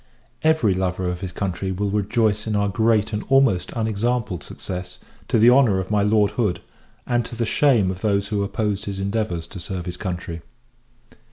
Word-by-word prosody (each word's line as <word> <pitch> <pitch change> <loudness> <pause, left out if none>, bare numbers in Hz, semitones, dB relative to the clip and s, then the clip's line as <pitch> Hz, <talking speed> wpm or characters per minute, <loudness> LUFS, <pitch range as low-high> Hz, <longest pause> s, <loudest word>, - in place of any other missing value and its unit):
Every 155 -11 +3
lover 90 0 -1
of 90 0 -3
his 95 -2 -4
country 95 0 -3
will 100 +2 -2
rejoice 105 +1 +1
in 110 - 0
our 100 0 +1
great 110 0 +2
and 105 - -2
almost 135 -10 +3
unexampled 110 -3 -1
success, 90 -1 -6 0.3
to - - +2
the 115 +3 +7
honour 125 -7 +4
of 95 +2 -4
my 105 -1 +3
Lord 105 0 +3
Hood, 105 -7 0 0.5
and 120 -1 +1
to 120 - -7
the 115 0 -1
shame 115 -6 +3
of 95 0 -8
those 100 -2 0
who 105 -2 0
opposed 105 0 -2
his 100 -1 -4
endeavours 100 -4 -2
to 95 - -9
serve 90 0 -5
his 90 0 -5
country. 90 -3 -5
100 Hz, 185 wpm, -22 LUFS, 95-110 Hz, 0.5 s, the